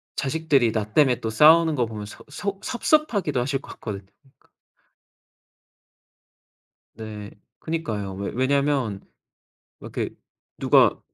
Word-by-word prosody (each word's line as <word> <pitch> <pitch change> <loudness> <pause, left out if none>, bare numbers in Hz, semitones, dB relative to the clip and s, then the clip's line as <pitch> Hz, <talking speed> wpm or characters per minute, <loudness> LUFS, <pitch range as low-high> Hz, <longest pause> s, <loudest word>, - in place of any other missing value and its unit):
자식들이 140 -5 +1
나 105 -1 -3
땜에 130 -5 +4
또 110 - -3
싸우는 160 +7 +6
거 125 -4 +1
보면 110 -2 -7
서 105 - -12
속 195 +6 -5
섭섭하기도 240 - +1
하실 135 +2 -1
것 - - -11
같거든요. 100 -3 -7 0.3
그 - - -32 2.5
네. 105 -2 -8 0.3
그니까요. 110 -12 -4
왜 100 +1 -4
왜냐면 130 -5 +1 0.8
이렇게 - - -4 0.5
누가 - - +4
130 Hz, 230 characters per minute, -24 LUFS, 110-160 Hz, 2.5 s, 싸우는